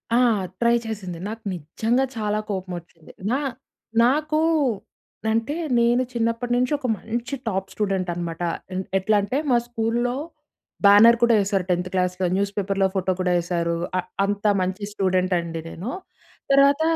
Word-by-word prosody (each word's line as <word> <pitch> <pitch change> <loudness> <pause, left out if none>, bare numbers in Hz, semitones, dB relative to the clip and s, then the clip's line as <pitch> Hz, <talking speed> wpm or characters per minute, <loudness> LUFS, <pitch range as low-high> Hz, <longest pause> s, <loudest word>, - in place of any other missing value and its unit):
ఆహ్, 235 -6 +3 0.2
ట్రై 235 0 +4
చేసింది. 190 -6 -5
నాకు 225 +1 -7
నిజంగా 225 - 0
చాలా 210 0 0
కోపం 185 -2 -3
వచ్చింది. 165 -1 -18 0.2
నా 265 - +2 0.6
నాకు 305 +4 +2 0.9
అంటే 230 +7 0 0.2
నేను 240 +2 +3
చిన్నప్పటి 230 +1 -1
నుంచి 250 +3 +1
ఒక 260 -3 -4
మంచి 235 +5 -4
టాప్ 190 -2 -1
స్టూడెంట్ 195 -3 -1
అనమాట. 170 -1 -5 0.3
ఎన్ 190 +1 -2
ఎట్లా 210 +3 +2
అంటే 250 +7 -2
మా 240 - +5
స్కూల్‌లో 240 +1 -1 0.7
బ్యానర్ 220 +4 +8
కూడా 235 -1 +5
వేసారు 195 -2 0
10త్ 180 +1 0
క్లాస్‌లో, 180 0 0
న్యూస్ 200 +1 0
పేపర్‌లో 195 -1 +1
ఫోటో 185 0 +1
కూడా 180 -1 +1
వేశారు. 170 -1 -1 0.2
ఆ! - - +2 0.3
అంత 205 +1 -3 0.2
మంచి 185 +3 -2
స్టూడెంట్ 185 -2 +1
అండి 165 -1 -5
నేను. 200 +11 -5 0.6
తర్వాత 280 +2 +5
205 Hz, 145 wpm, -23 LUFS, 185-235 Hz, 0.9 s, బ్యానర్